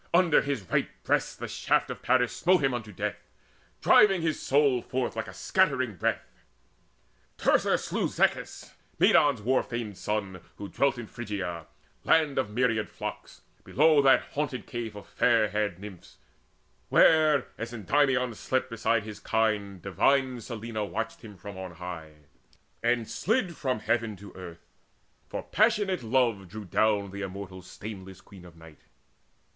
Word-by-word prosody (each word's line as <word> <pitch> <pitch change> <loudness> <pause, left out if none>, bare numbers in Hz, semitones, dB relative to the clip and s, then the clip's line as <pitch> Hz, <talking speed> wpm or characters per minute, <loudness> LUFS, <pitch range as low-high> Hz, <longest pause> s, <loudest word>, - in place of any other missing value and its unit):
Under 175 -3 +5
his 140 -7 -3
right 90 - 0
breast - - 0
The - - -5
shaft - - 0
of - - -8
Paris 125 -1 +2
smote 180 -3 +3
him 135 -1 +2
unto 110 -3 -5
death, 95 - -3 0.7
Driving 195 -5 +5
his 160 -2 0
soul 140 -3 +3
forth 125 +1 -3
like - - -3
a - - -8
scattering - - +1
breath. - - -3 0.9
Teucer - - +3
slew - - -2
Zechis, - - -1 0.2
Medon's 140 -8 +4
war 130 +4 +3
famed 120 -4 -5
son, 100 -4 -3 0.2
Who 100 - -7
dwelt 140 -2 +1
in 120 - -6
Phrygia, 95 -8 -5 0.4
land 155 -4 +3
of 130 - -1
myriad 115 -1 0
flocks, - - -8 0.2
Below 155 +1 +4
that 135 -1 +5
haunted 140 -6 -3
cave 115 -3 -5
of 100 - -9
fair 115 -3 +2
haired 105 -4 -1
Nymphs 95 -2 -12 0.7
Where, 155 -3 +5
as 115 +1 -4
Endymion 125 +2 +1
slept 130 +3 -2
beside 115 -1 +1
his 105 -1 -8
kine, 105 -4 -1
Divine 125 +6 +1
Selene 110 -2 -5
watched 115 0 -4
him 105 -3 -12
from 100 -1 -9
on 95 -2 -7
high, 80 -4 -9 0.6
And 120 -1 +1
slid 205 -5 -1
from 130 -7 -2
heaven 110 -1 0
to 100 +1 -12
earth; 90 -3 -10 0.6
for - - -4
passionate 205 -3 +2
love 115 -5 +1
Drew 105 +3 -8
down 100 0 +1
the 100 +1 -6
immortal 95 -1 -7
stainless 95 0 -9
Queen 95 -3 -15
of 85 -2 -14
Night. 80 -2 -15
115 Hz, 150 wpm, -28 LUFS, 100-130 Hz, 0.9 s, Under